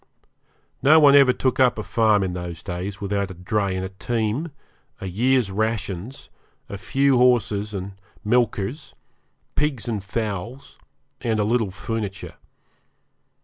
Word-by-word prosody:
No 155 +3 +7
one 145 -2 +7
ever 140 -2 +7
took 130 0 -1
up 125 -3 +4
a 110 - -3
farm 110 -3 +2
in 90 -2 -2
those 90 -2 -6
days 95 +1 -5
without 100 -1 -2
a 95 - -8
dray 95 +2 -1
and 95 0 -3
a - - -5
team, 115 - -2 0.5
a - - -6
year's 115 +3 +1
rations, 110 +1 -3 0.4
a - - -7
few 135 +7 +2
horses 105 -4 +2
and 95 0 -7 0.2
milkers, 120 +3 0 0.6
pigs 140 -6 -1
and 110 -5 -2
fowls, 110 +4 -5 0.4
and 110 -3 0
a - - +3
little 110 -1 +1
furniture. 100 -1 -5
110 Hz, 140 wpm, -23 LUFS, 95-125 Hz, 0.6 s, No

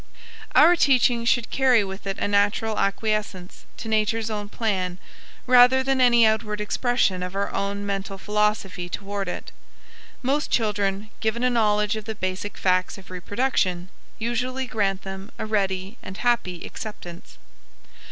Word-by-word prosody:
Our 335 +4 +7
teaching 250 -6 +3
should 235 -1 +1
carry 255 -5 +4
with 195 +1 -7
it 195 - -3
a - - -1
natural 205 +2 +1
acquiescence 200 -2 -2
to 225 - -7
Nature's 220 +1 0
own 205 -1 -4
plan, 190 -6 -2 0.5
rather 255 +1 +6
than 265 0 +1
any 240 -2 +6
outward 220 -1 0
expression 210 -3 0
of 180 +1 -5
our 200 0 -2
own 200 +1 -2
mental 195 -1 -3
philosophy 210 -3 -1
toward 200 +1 -4
it. 180 - -6 0.7
Most 285 +4 0
children, 205 -2 0
given 220 +2 -1
a 250 - +3
knowledge 210 -2 +2
of 215 -1 -6
the 220 -1 -4
basic 185 +1 -4
facts 185 0 +1
of 190 -1 -14
reproduction, 185 -2 -1 0.3
usually 250 +3 -2
grant 195 -5 -1
them 190 +1 -7
a - - -4
ready 195 0 -2
and 185 - -8
happy 220 -8 0
acceptance. 175 -5 -9
210 Hz, 145 wpm, -24 LUFS, 195-235 Hz, 0.7 s, Our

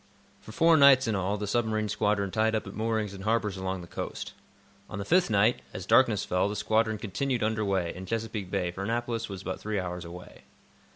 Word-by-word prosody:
For - - -12
four 165 +7 +4
nights, 140 -3 +7
in 110 - +1
all, 100 +1 -1
the 105 - -3
submarine 110 0 0
squadron 105 -1 0
tied 110 +1 +1
up 110 - -2
at 100 - -8
moorings 110 -2 -1
in 95 - -9
harbors 105 -1 0
along 95 -1 -3
the 85 - -10
coast. - - -6 0.6
On - - -6
the 100 - -4
fifth 180 - +3
night, 110 +4 +3
as 90 - -5
darkness 110 -3 +4
fell, 90 +2 +1
the 105 - -4
squadron 110 +1 +1
continued 120 +4 -2
under 110 0 0
way, 95 -4 0
in 95 +1 -9
Chesapeake 110 -3 -3
Bay, 90 -2 -1
for 95 - -7
Annapolis 115 +1 -2
was 95 -2 -7
but 95 - -4
three 105 -1 -2
hours 90 -1 -4
away. 90 +1 -11
105 Hz, 215 wpm, -28 LUFS, 95-115 Hz, 0.6 s, nights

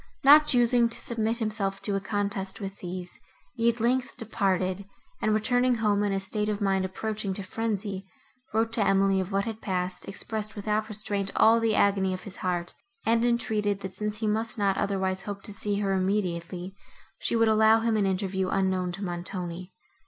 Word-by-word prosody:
Not 300 +2 +8
choosing 240 -2 +4
to 230 - -4
submit 230 -1 -1
himself 210 -4 -2
to 205 - -1
a - - +1
contest 200 -2 -2
with 195 -1 -6
these, 180 0 -7 0.3
he, 235 -1 +2
at 235 0 -2
length, 250 +3 0
departed, 195 -4 -1 0.4
and, 215 - +2
returning 245 +3 +2
home 210 -3 +1
in 205 -1 +1
a 195 - 0
state 210 +2 -1
of 210 -1 -1
mind 195 -2 +1
approaching 205 +1 -3
to 200 - -5
frenzy, 200 -2 -3 0.4
wrote 225 +1 0
to 225 - +2
Emily 195 -1 +3
of 190 +1 -3
what 195 0 +1
had 225 -1 -5
passed, 185 -1 -3
expressed 215 +1 -5
without 215 +1 -1
restraint 205 -2 -1
all 230 +1 +6
the 225 -2 +1
agony 195 -2 +2
of 185 - -9
his 195 - -9
heart, 175 -1 -2 0.3
and 230 0 +3
entreated, 215 -4 0
that, 190 -1 -6
since 210 +2 -2
he 220 - 0
must 220 +2 0
not 200 -2 +2
otherwise 190 -2 -1
hope 200 0 -6
to 210 - -7
see 205 0 -1
her 195 -1 +1
immediately, 185 -1 -2 0.4
she - - 0
would 225 0 +4
allow 220 +1 +5
him 225 -1 +1
an 205 -2 +2
interview 190 0 -1
unknown 190 -2 0
to 195 +3 -6
Montoni. 175 0 -5
205 Hz, 190 wpm, -27 LUFS, 190-220 Hz, 0.4 s, Not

